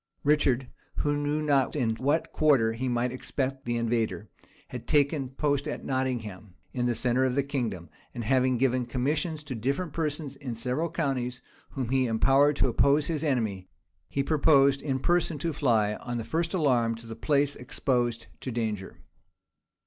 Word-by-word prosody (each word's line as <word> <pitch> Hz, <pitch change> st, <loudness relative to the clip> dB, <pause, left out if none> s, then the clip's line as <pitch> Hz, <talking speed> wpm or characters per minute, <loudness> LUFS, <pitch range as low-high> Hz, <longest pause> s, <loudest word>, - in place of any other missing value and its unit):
Richard, 140 Hz, -4 st, +2 dB, 0.3 s
who 145 Hz, 0 st, 0 dB
knew 145 Hz, +1 st, -1 dB
not 140 Hz, -2 st, +2 dB
in 115 Hz, -6 st, 0 dB
what 145 Hz, +6 st, 0 dB
quarter 135 Hz, -8 st, +3 dB
he 125 Hz, +3 st, -2 dB
might 120 Hz, 0 st, 0 dB
expect 130 Hz, +1 st, -3 dB
the 120 Hz, 0 st, -1 dB
invader, 115 Hz, -3 st, -1 dB, 0.4 s
had -, -, -8 dB
taken 140 Hz, -2 st, +2 dB
post 140 Hz, +1 st, -1 dB
at -, -, -5 dB
Nottingham, 110 Hz, -8 st, -3 dB, 0.2 s
in 125 Hz, -1 st, 0 dB
the 120 Hz, -, 0 dB
centre 125 Hz, +3 st, +2 dB
of 130 Hz, -1 st, +1 dB
the 140 Hz, -, +2 dB
kingdom; 115 Hz, -, -3 dB, 0.2 s
and 120 Hz, -, -5 dB
having 130 Hz, +1 st, +2 dB
given 130 Hz, -1 st, +1 dB
commissions 150 Hz, +5 st, -1 dB
to 150 Hz, -3 st, -6 dB
different 140 Hz, -, -2 dB
persons 150 Hz, -3 st, -3 dB
in 135 Hz, -4 st, -5 dB
the -, -, -7 dB
several 130 Hz, +8 st, -1 dB
counties, 135 Hz, -6 st, -2 dB, 0.3 s
whom 130 Hz, -4 st, -4 dB
he 130 Hz, -1 st, +2 dB
empowered 135 Hz, +6 st, +4 dB
to 135 Hz, -, +2 dB
oppose 140 Hz, +4 st, +3 dB
his 160 Hz, -1 st, -2 dB
enemy, 110 Hz, -, -1 dB, 0.4 s
he 140 Hz, -, 0 dB
purposed 140 Hz, -2 st, +4 dB
in 135 Hz, -3 st, -1 dB
person 170 Hz, +2 st, +1 dB
to 165 Hz, +3 st, -2 dB
fly, 110 Hz, -7 st, +2 dB
on 120 Hz, -1 st, -5 dB
the 115 Hz, -, -3 dB
first 165 Hz, -, -1 dB
alarm, 125 Hz, -8 st, +2 dB
to 115 Hz, +1 st, -12 dB
the 115 Hz, 0 st, -7 dB
place 145 Hz, +1 st, +1 dB
exposed 120 Hz, -2 st, -1 dB
to 130 Hz, -, -5 dB
danger. 110 Hz, -4 st, -4 dB
130 Hz, 170 wpm, -28 LUFS, 120-145 Hz, 0.4 s, empowered